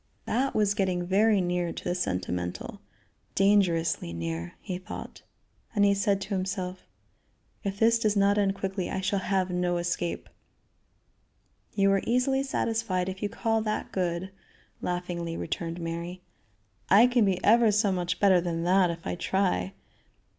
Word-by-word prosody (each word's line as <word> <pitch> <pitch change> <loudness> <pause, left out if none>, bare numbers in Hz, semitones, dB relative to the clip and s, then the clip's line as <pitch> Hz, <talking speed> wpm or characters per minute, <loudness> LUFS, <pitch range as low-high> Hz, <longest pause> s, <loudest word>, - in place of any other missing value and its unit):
That 265 +4 0
was 210 -2 +3
getting 185 -4 0
very 205 +2 +3
near 175 -1 -1
to - - -8
the - - -1
sentimental; 90 - -3 0.5
dangerously 180 - +2
near, 85 0 -4
he 185 -3 -5
thought; 185 - -9 0.5
and 205 -1 +4
he 200 - +4
said 200 0 +1
to 195 - -6
himself: 185 -2 -3 0.8
"If 200 -1 -3
this 230 +2 +4
does 215 -2 +1
not 200 +1 +3
end 195 -1 +1
quickly 195 -1 -3
I 190 - -2
shall 195 +1 0
have 190 -1 0
to 180 0 0
escape." 175 0 -2 1.5
"You 195 -1 +4
are 195 -1 +2
easily 255 +3 +2
satisfied 225 -8 -1
if 190 +1 -7
you 205 - -1
call 225 +1 0
that 215 -1 -3
good," 180 0 -2 0.5
laughingly 175 -2 -3
returned 165 +1 -4
Mary. 170 +2 -5 0.7
"I 205 +5 +7
can 245 -2 +3
be 195 -3 +2
ever 230 0 +5
so 210 -1 +2
much 180 -1 -2
better 190 -3 +5
than 170 -1 -2
that 185 +1 +4
if 165 0 -6
I - - -2
try." 190 +1 0
190 Hz, 155 wpm, -27 LUFS, 175-205 Hz, 1.5 s, I